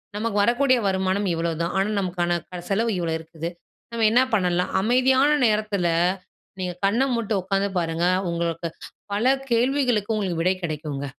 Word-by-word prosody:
நமக்கு 215 0 -2
வரக்கூடிய 255 +4 +3
வருமானம் 190 +1 0
இவ்ளோதான். 165 0 -2
ஆனா, 195 +2 +1
நமக்கான 175 -2 -1
க 180 -1 -6
செலவு 225 +4 +1
இவ்ளோ 165 -2 -1
இருக்குது. 160 +1 -6 0.4
நம்ம 230 -1 +1
என்ன 245 +3 +5
பண்ணலாம்? 180 -2 0
அமைதியான 260 +5 +3 0.2
நேரத்தில 210 -4 0 0.7
நீங்க 180 -1 -3
கண்ண 215 +6 +2
மூட்டு 230 -2 -1
உட்காந்து 195 +2 0
பாருங்க! 165 +1 0 0.2
உங்களுக்கு 170 0 -2 0.5
பல 210 +5 +1 0.2
கேள்விகளுக்கு 240 -3 +1
உங்களுக்கு 185 -6 -1
விடை 185 +2 +2
கிடைக்குங்க. 150 -3 -4
195 Hz, 140 wpm, -23 LUFS, 170-225 Hz, 0.7 s, என்ன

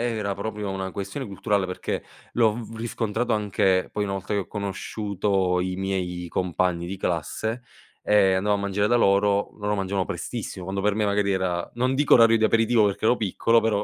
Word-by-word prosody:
era 100 -2 -2
proprio 105 0 -4
una 95 -1 -4
questione 100 +9 -5
culturale 100 -1 -1
perché 90 - -4 0.3
l'ho 115 -3 +3
v 115 -1 -8
riscontrato 115 +1 -1
anche 95 -3 +1
poi 105 - -1
una 100 - -2
volta 95 +1 -4
che 100 - +1
ho 90 - -10
conosciuto 100 -2 -1
i 90 0 -2
miei 90 -2 -3
compagni 90 -1 0
di 95 +3 -4
classe 110 - -2 0.4
e 100 -2 +4
andavo 100 +2 +1
a 100 - -2
mangiare 100 +1 0
da 120 - +3
loro. 100 -2 +3
Loro 105 0 -1
mangiavano 95 -1 -1
prestissimo 90 -2 -5
quando 95 +1 -3
per 105 0 +3
me, 105 +1 0
magari, 100 0 +1
era 90 -2 -1
non 130 +2 +1
dico 145 +1 +4
orario 115 -1 +7
di 110 - -1
aperitivo 115 0 +4
perché 100 +1 -1
ero 120 - +5
piccolo, 115 +3 +2
però 105 -2 0
100 Hz, 190 wpm, -25 LUFS, 95-110 Hz, 0.4 s, orario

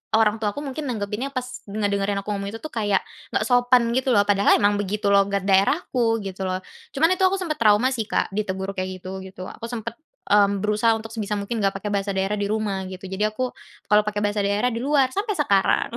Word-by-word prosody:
orang 220 0 +3
tuaku 215 +6 -2
mungkin 290 +1 -5
nanggepinnya 215 +2 -3
pas 255 -1 -2 0.2
ngedengerin 200 -1 -1
aku 210 - -9
ngomong 200 0 -4
itu 225 - -6
tuh, 310 - -6
kayak 205 -5 0 0.3
enggak - - +1
sopan, 245 -1 +4
gitu 260 -1 +1
loh. 205 - +6
Padahal 200 0 +4
emang 205 0 +3
begitu 205 +1 -1
logat 200 0 +3
daerahku, 225 - +2
gitu 190 -1 -5
loh. 185 0 -2 0.3
Cuman 320 +5 +3
itu 380 - 0
aku 375 - +3
sempat 310 -4 -2
trauma, 220 +1 +4
sih, 230 -5 -2
Kak. - - 0
Ditegur 195 -1 -3
kayak 185 0 -4
gitu, 190 +1 -6
gitu. 185 -1 -8
Aku 230 - -8
sempet, 235 +5 -5 0.3
mmm, 200 -1 +4
berusaha 210 +2 +2
untuk 225 0 -5
sebisa 215 -2 -4
mungkin 205 +3 -3
enggak 195 - +2
pakai 210 - -3
bahasa 200 0 -1
daerah 195 +2 -1
di 200 - -1
rumah, 205 -2 -2
gitu. 185 0 -8
Jadi, 195 +2 -1
aku 245 +4 -1 0.4
kalau 210 0 +5
pakai 210 -1 -2
bahasa 205 -1 0
daerah 205 +5 +1
di 230 - -4
luar 270 +1 +2
sampai 415 - -2
sekarang. 200 - +2
210 Hz, 215 wpm, -23 LUFS, 200-235 Hz, 0.4 s, loh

